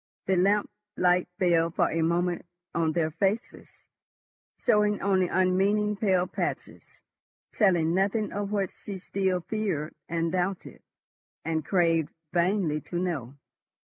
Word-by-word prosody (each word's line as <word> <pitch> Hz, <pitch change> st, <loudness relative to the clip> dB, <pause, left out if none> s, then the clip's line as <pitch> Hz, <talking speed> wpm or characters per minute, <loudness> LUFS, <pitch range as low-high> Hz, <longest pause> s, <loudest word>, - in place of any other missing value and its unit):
The 190 Hz, -, +2 dB
lamp 200 Hz, +3 st, +3 dB, 0.3 s
light 180 Hz, 0 st, +3 dB
fell 170 Hz, -2 st, +3 dB
for 165 Hz, -, +1 dB
a 165 Hz, -, 0 dB
moment 175 Hz, +2 st, 0 dB, 0.3 s
on 160 Hz, -2 st, +1 dB
their 160 Hz, -1 st, 0 dB
faces, 200 Hz, +7 st, -2 dB, 0.9 s
showing 210 Hz, -3 st, +2 dB
only 190 Hz, -2 st, +2 dB
unmeaning 195 Hz, +4 st, +2 dB
pale 190 Hz, -3 st, +2 dB
patches, -, -, -5 dB, 0.5 s
telling 175 Hz, -6 st, +3 dB
nothing 205 Hz, +3 st, +1 dB
of 205 Hz, 0 st, -3 dB
what 200 Hz, -3 st, 0 dB
she 200 Hz, -2 st, -8 dB
still 190 Hz, -1 st, -1 dB
feared, 180 Hz, -7 st, -2 dB, 0.2 s
and 165 Hz, 0 st, -1 dB
doubted, 185 Hz, +1 st, -3 dB, 0.6 s
and 160 Hz, -1 st, -1 dB
craved 165 Hz, -2 st, +2 dB, 0.2 s
vainly 175 Hz, -3 st, +1 dB
to 175 Hz, -, -5 dB
know. 155 Hz, -8 st, -3 dB
180 Hz, 125 wpm, -27 LUFS, 165-200 Hz, 0.9 s, lamp